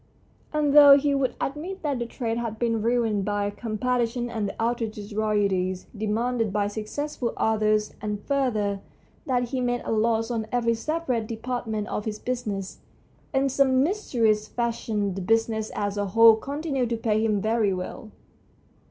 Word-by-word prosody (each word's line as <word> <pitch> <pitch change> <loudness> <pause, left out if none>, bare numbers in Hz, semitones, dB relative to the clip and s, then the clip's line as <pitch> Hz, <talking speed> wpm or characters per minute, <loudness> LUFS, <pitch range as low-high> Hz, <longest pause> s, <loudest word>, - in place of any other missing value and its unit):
And 300 -2 +1
though 285 -1 +10
he 285 0 +1
would 275 -2 0
admit 330 +8 -4
that 285 -4 -1
the 235 - -3
trade 230 -1 -3
had 230 -2 -4
been 230 -1 0
ruined 225 -3 +1
by 205 0 -1
competition 240 +2 -1
and 215 -3 -2
the - - -10
outrageous 225 -3 -2
royalties 200 -4 0
demanded 225 +1 -1
by 205 0 0
successful 235 +4 -4
authors, 215 -1 +1
and, 210 -1 -3
further, 215 -8 0 0.5
that 245 -2 0
he 260 -1 -2
made 245 -1 -1
a - - -2
loss 225 +1 +1
on 225 -2 -2
every 235 -1 +2
separate 255 -3 -2
depart 240 +2 -4
ment 215 -1 -2
of 210 - -3
his 215 -1 -3
business, 215 -6 -4 0.5
in 270 0 +2
some 265 -1 +3
mysterious 230 - +1
fashion 225 -4 -2
the 195 - -5
business 220 +2 +1
as 205 0 -2
a 205 - 0
whole 225 +3 +7
continued 275 0 -2
to 235 - -1
pay 220 -1 +1
him 215 -2 +1
very 215 0 +1
well. 185 +4 -5
225 Hz, 160 wpm, -25 LUFS, 210-250 Hz, 0.5 s, though